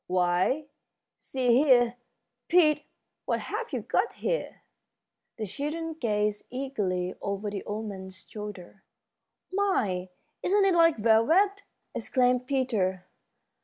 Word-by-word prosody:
Why, 180 +11 +1 0.5
see 255 -2 -2
here, 245 -3 +5 0.5
Pete, 305 -4 +4 0.4
what - - 0
have 455 +3 -4
you - - -2
got - - 0
here?" - - -3 0.7
The 220 - -3
children 310 - -4
gazed 210 -7 -1
eagerly 205 -9 -2
over 200 +1 -3
the 200 -2 -4
old 215 +2 -4
man's 190 -2 -8
shoulder. 205 -3 -9 0.7
"My, 210 - 0 0.3
isn't 395 +2 +3
it 385 - +4
like 330 -2 +5
velvet!" 315 - +4 0.3
exclaimed 250 -1 +1
Peter. 215 -10 0
240 Hz, 110 wpm, -28 LUFS, 200-310 Hz, 0.7 s, here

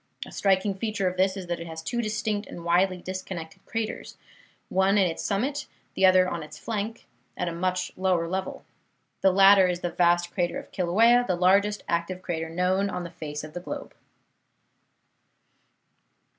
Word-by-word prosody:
A - - -11
striking 195 0 +1
feature 200 -1 -2
of 180 - -1
this 190 +1 +1
is 190 - -5
that 175 -1 -3
it 170 - -7
has 160 0 -7
two 240 +7 -1
distinct 215 -1 -2
and 170 - -9
widely 180 +2 +3
disconnected 185 -1 -7
craters, 225 -1 -4 0.5
one 190 +2 +2
on 200 - +5
its 165 -2 -3
summit, 265 +8 -1 0.3
the 190 - +4
other 185 0 +5
on 170 -2 -3
its 155 - -10
flank, 220 0 -4 0.3
at - - -2
a - - -1
much 180 +1 -1
lower 180 -3 +1
level. 190 +2 -4 0.6
The 190 - +5
latter 195 0 +7
is 180 -1 -2
the 175 - -2
vast 175 0 +2
crater 175 -2 -1
of - - -9
Kilauea, 225 +7 +4
the 180 - +1
largest 200 +4 +3
active 175 +2 -2
crater 165 -2 -3
known 185 +4 +1
on 180 - -4
the 170 - -7
face 150 -1 -6
of 155 0 -9
the 175 - -4
globe. 180 - -7
185 Hz, 175 wpm, -26 LUFS, 175-200 Hz, 0.6 s, latter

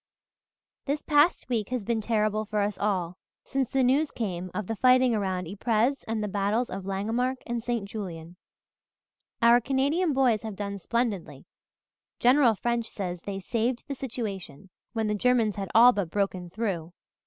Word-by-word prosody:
"This 290 +1 -2
past 300 +3 +3
week 225 -5 -1
has 250 -3 -2
been 230 0 0
terrible 215 -1 0
for 215 -1 -1
us 205 0 -1
all, 185 -3 -1 0.3
since 270 -3 -1
the 270 -1 +2
news 280 +5 +3
came 185 -5 -4
of 210 - -4
the 225 - -3
fighting 255 +1 +4
around 190 -4 -1
Ypres 225 +7 0
and 220 -1 -1
the - - -1
battles 205 +4 0
of 190 0 -5
Langemarck 230 +7 -1
and 235 -1 -3
St. 235 -4 -2
Julien. 175 -5 -7 1.1
Our 235 +1 +7
Canadian 280 +7 +1
boys 255 -6 +2
have 220 -3 -6
done 200 0 -4
splendidly 230 -2 -2 0.7
General 250 -2 +5
French 235 +2 -1
says 180 -3 -5
they 195 +1 -5
'saved 235 +4 -2
the 280 - -3
situation,' 200 - -6 0.2
when 225 -2 -1
the 210 - 0
Germans 225 -1 +2
had 195 -2 -4
all 240 +2 +9
but 200 -7 -2
broken 185 -2 -2
through. 175 -5 -3
220 Hz, 165 wpm, -27 LUFS, 195-245 Hz, 1.1 s, all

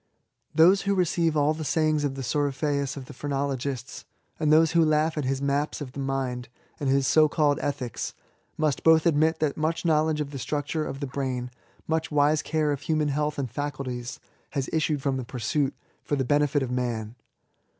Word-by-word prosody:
Those 180 +5 +6
who 200 0 0
receiye 170 -3 +1
all 150 +1 +3
the 160 - -7
sajdngs 155 0 +1
of 140 -2 -1
the 135 - -5
Coryphaeus 140 +1 -1
of 135 - -7
the - - -11
phrenologists, 135 -2 -3 0.4
and 155 -2 +2
those 160 +1 +5
who 170 0 +4
laugh 155 +1 +2
at 150 -3 -2
his 135 +1 -1
maps 140 +2 0
of 140 -4 -6
the 140 - -8
mind 130 -2 -2 0.3
and 140 - -1
his 135 0 +3
so 155 +1 +5
called 145 -2 +2
ethics, 135 -5 -3 0.4
must 155 -4 0
hoik 160 -1 +5
admit 160 0 +3
that 155 -3 -1
much 160 +2 -1
knowledge 155 -1 +2
of 145 -1 -3
the 140 - -6
structure 150 +4 -2
of 135 - -6
the - - -1
brain, 130 -2 -3 0.4
much 160 0 0
wise 150 +1 +3
care 155 -1 0
of 140 -1 -2
human 155 0 0
health 150 +1 -1
and 130 -5 -3
faculties, 130 -3 -4 0.3
has 140 -3 -2
issued 155 -3 0
from 135 -2 0
the 130 - -3
pursuit, 130 +4 -1 0.3
for 145 - -1
the 135 -2 -1
benefit 145 +1 +2
of 125 - -4
man. 120 -3 -2
145 Hz, 190 wpm, -26 LUFS, 135-155 Hz, 0.4 s, Those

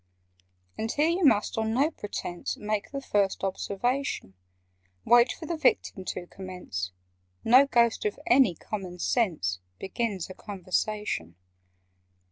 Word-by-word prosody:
"And 220 +1 -1
here 300 +3 +2
you 350 +2 0
must 225 -5 +3
on 220 0 0
no 285 +5 +3
pretence 190 - -5
Make 210 -1 -2
the 275 -1 -5
first 200 -6 +1
observation. 200 - -2 0.7
Wait 240 +1 +6
for 325 - -7
the 335 - -2
Victim 315 - +1
to 180 - -4
commence: 180 - -6 0.5
No 255 +4 +7
Ghost 235 -5 +3
of 210 - -1
any 245 -8 +5
common 185 -1 -6
sense 165 - 0 0.2
Begins 195 -2 -2
a 185 - -8
conversation. 205 - -3
210 Hz, 125 wpm, -28 LUFS, 185-250 Hz, 0.7 s, No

